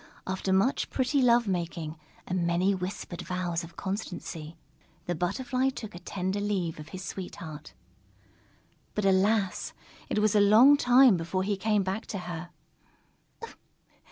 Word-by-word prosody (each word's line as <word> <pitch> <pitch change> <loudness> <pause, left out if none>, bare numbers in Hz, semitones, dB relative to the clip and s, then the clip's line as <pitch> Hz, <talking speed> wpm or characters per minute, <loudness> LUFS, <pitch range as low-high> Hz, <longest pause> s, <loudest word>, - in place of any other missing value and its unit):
After 190 0 -2
much 195 +8 +2
pretty 265 +2 +1
love 240 -2 +4
making 170 -4 -3 0.3
and 180 -2 -1
many 180 +3 +2
whispered 185 -1 -5
vows 175 -2 -2
of 165 0 -11
constancy, 175 -5 -5 0.5
the 175 - -1
Butterfly 255 +10 0
took 225 -5 -7
a 175 - -8
tender 190 +2 -3
leave 190 -6 -2
of 150 - -9
his 185 +2 -7
sweetheart. 165 -5 -8 1.2
But 210 - 0
alas! 195 +1 +2 0.4
It - - -1
was 210 -1 +3
a 210 - +5
long 225 +8 +7
time 250 -5 +6
before 170 +3 -2
he 200 +1 0
came 210 +1 +1
back 190 +3 -3
to 200 - -4
her. 175 -2 -6
190 Hz, 140 wpm, -28 LUFS, 175-210 Hz, 1.2 s, long